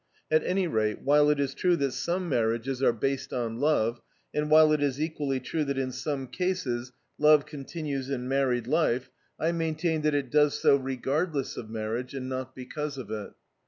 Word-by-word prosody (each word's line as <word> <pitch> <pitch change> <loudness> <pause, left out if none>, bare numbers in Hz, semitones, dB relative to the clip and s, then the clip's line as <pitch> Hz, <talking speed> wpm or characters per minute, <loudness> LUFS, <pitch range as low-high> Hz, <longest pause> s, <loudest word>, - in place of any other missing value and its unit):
At 155 - +4
any 185 +1 +1
rate, 110 -7 -1
while 145 +1 +5
it 150 -1 +2
is 140 -1 0
true 180 +3 +2
that 140 -4 0
some 175 +7 -2
marriages 120 0 0
are 135 - +5
based 135 +4 -2
on 115 -2 -2
love, 120 -6 +1 0.3
and 150 0 -1
while 155 0 +7
it 150 -1 +2
is 140 -1 0
equally 150 -4 -1
true 155 +5 -2
that 140 -1 -2
in 130 -1 -1
some 140 0 -3
cases 130 -8 -2 0.3
love 150 -1 +6
continues 145 -2 -5
in 125 -2 -3
married 130 -3 +1
life, 130 -3 +1 0.3
I 165 - +1
maintain 160 -1 -1
that 150 -1 +1
it 140 -3 -1
does 150 -1 +3
so - - +5
regardless 135 +3 -1
of 110 - -7
marriage, 115 +4 -4
and 130 -1 -4
not 130 0 -5
because 140 +3 -5
of 115 -5 -7
it. 105 -2 -5
140 Hz, 190 wpm, -28 LUFS, 125-155 Hz, 0.3 s, while